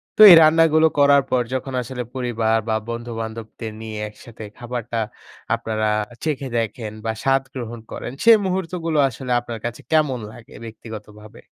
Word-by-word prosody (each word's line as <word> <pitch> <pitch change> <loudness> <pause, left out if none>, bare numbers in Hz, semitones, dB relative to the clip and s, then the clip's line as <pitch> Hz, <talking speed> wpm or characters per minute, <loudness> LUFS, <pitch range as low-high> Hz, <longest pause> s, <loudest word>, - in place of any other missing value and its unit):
তো - - +2
এই - - +12
রান্নাগুলো 160 0 +5
করার 140 0 +6
পর 125 - +2
যখন 130 +1 -3
আসলে 125 +1 -5
পরিবার 115 -3 0
বা 110 - +2
বন্ধুবান্ধবদের 115 -1 -6
নিয়ে 110 -1 -6
একসাথে 110 +1 -13
খাবারটা 120 -1 -5 0.6
আপনারা 110 -1 -2 0.4
চেখে 140 -4 -2
দেখেন 115 -1 -3
বা 110 - 0
স্বাদ 135 0 +2
গ্রহণ 120 -2 -6
করেন, - - -6
সেই 230 -1 +8
মুহূর্তগুলো 180 -4 -2
আসলে 125 0 -7
আপনার 120 -2 -7
কাছে 120 0 -5
কেমন 150 -5 +2
লাগে 115 - -15
ব্যক্তিগতভাবে? 110 -1 -11
120 Hz, 145 wpm, -21 LUFS, 110-140 Hz, 0.6 s, এই